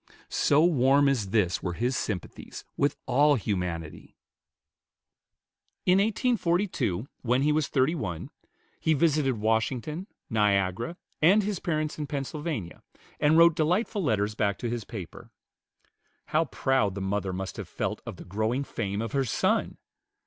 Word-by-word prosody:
So 150 +2 +3
warm 140 -3 +4
as 120 -8 0
this 95 -5 +1
were 90 - -2
his 120 +7 -1
sympathies 105 -6 -5
with 140 - +1
all 145 +2 +4
humanity! 90 - -4 1.7
In 180 +1 +5
1842, 190 - 0
when 125 +2 +1
he 150 - +3
was 150 -1 +1
thirty 135 +3 +2
one, 95 - -4 0.5
he 160 - +2
visited 145 -4 +2
Washington, 120 - -1 0.2
Niagara, 105 - +1 0.2
and 195 +7 +5
his 200 -2 -2
parents 155 -2 -2
in 150 - -3
Pennsylvania, 140 - -4 0.4
and 150 +2 +4
wrote 170 -1 +7
delightful 180 +6 +1
letters 105 - +1
back 100 -2 0
to 120 - -3
his 120 -3 -3
paper. 95 -7 -9 1.0
How 160 +2 +2
proud 130 -9 0
the 100 - -4
mother 95 0 -1
must 95 +1 -5
have - - -6
felt - - -3
of - - -7
the - - -11
growing 110 +8 -1
fame 105 -5 -3
of 115 - -4
her 135 -1 +1
son! 115 - 0
130 Hz, 140 wpm, -27 LUFS, 105-155 Hz, 1.7 s, wrote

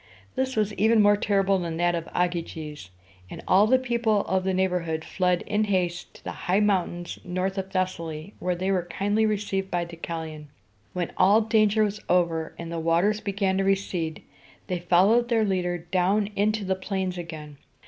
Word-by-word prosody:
This 260 0 -1
was 215 -1 +1
even 220 +3 +3
more 205 0 +6
terrible 195 -1 +1
than 165 -2 -3
that 175 0 +2
of 170 -1 -4
Ogyges; 165 - -3 0.4
and - - -9
all 200 +3 +5
the 260 +3 +5
people 235 -4 +1
of 190 0 0
the 190 - 0
neighborhood 180 -4 -1
fled 180 -2 0
in 210 +1 0
haste 180 -3 -1
to - - -16
the - - -4 0.2
high 190 +3 +4
mountains 180 -4 0
north 185 +2 -2
of 190 0 -5
Thes´sa 185 -2 -1
ly, 155 +4 -7
where 180 0 -1
they 185 +2 -1
were 180 -3 0
kindly 205 +5 +1
received 200 -2 -2
by 175 -2 0
Deucalion. 160 -2 -6 0.5
When 180 -2 -2
all 200 +4 +5
danger 215 -1 +3
was 210 0 -2
over, 170 -3 +1
and 170 0 -7
the 170 - -3
waters 170 +6 +2
began 195 -1 0
to - - +2
recede, 190 -5 -1 0.4
they 180 -1 -2
followed 195 +8 +3
their 225 -2 +3
leader 180 -3 0
down 185 +5 0
into 210 0 +1
the 190 - +1
plains 190 -1 -3
again. 155 -4 -8
185 Hz, 180 wpm, -26 LUFS, 175-205 Hz, 0.5 s, more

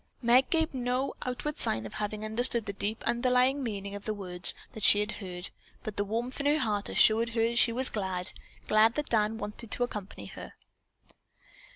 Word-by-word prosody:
Meg 245 +3 +4
gave 320 -2 0
no 255 +1 -2
outward 270 +4 -4
sign 110 +1 -1
of 110 - -9
having 215 0 -4
understood 235 +1 +3
the 200 - -5
deep 210 +3 -5
underlying 255 +3 +1
meaning 200 -5 -5
of 205 0 -9
the 215 - -3
words 180 -3 +5 0.2
that 220 - -9
she 205 - +6
had 210 0 -2
heard, 180 -1 -6 0.3
but 215 - -6
the 205 - -1
warmth 230 +6 -4
in 285 - -1
her 295 +1 +3
heart 210 -8 -2
assured 225 +2 +3
her 225 - +1
that 235 +1 +1
she 235 - +5
was 255 +3 +6
glad, 190 -3 -4 0.4
glad 220 +2 +3
that 300 -1 -4
Dan 220 -1 0
wanted 210 +2 -8
to 245 - +1
accompany 205 - -7
her. - - -11
220 Hz, 195 wpm, -28 LUFS, 205-250 Hz, 0.4 s, she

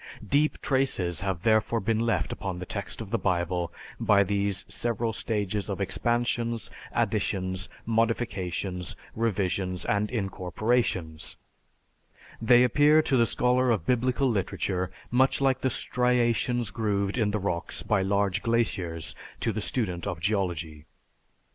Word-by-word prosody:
Deep 150 +2 +2
traces 100 - +1
have 95 -3 -2
therefore 110 +1 +3
been 110 +2 0
left 115 -8 0
upon 95 -3 -4
the 90 - -6
text 100 +4 -4
of 105 -3 -8
the 115 - +1
Bible 90 -2 0 0.3
by 100 -1 +4
these 100 0 0
several 115 -1 -1
stages 105 -2 -2
of 100 - -3
expansions, 120 +3 0 0.2
additions, 95 -2 -1 0.2
modifications, 100 -6 -1 0.2
revisions, 95 -4 -1
and 105 +1 +1
incorporations 95 -5 -1 1.1
they 120 +2 +6
appear 145 +5 +5
to 135 - +1
the 120 -2 +4
scholar 125 +2 +2
of 105 -8 +1
biblical 125 +2 +2
literature 95 -4 -1 0.2
much 130 +2 +3
like 135 -1 +2
the 130 - +2
striations 120 -2 +1
grooved 100 -2 -1
in 110 -4 +1
the 105 - 0
rocks 90 -4 -3
by 105 - +2
large 100 0 +1
glaciers 95 -8 -1 0.3
to - - 0
the - - -2
student 90 -8 -2
of 85 - -3
Geology." 85 -6 -2
105 Hz, 130 wpm, -27 LUFS, 95-120 Hz, 1.1 s, they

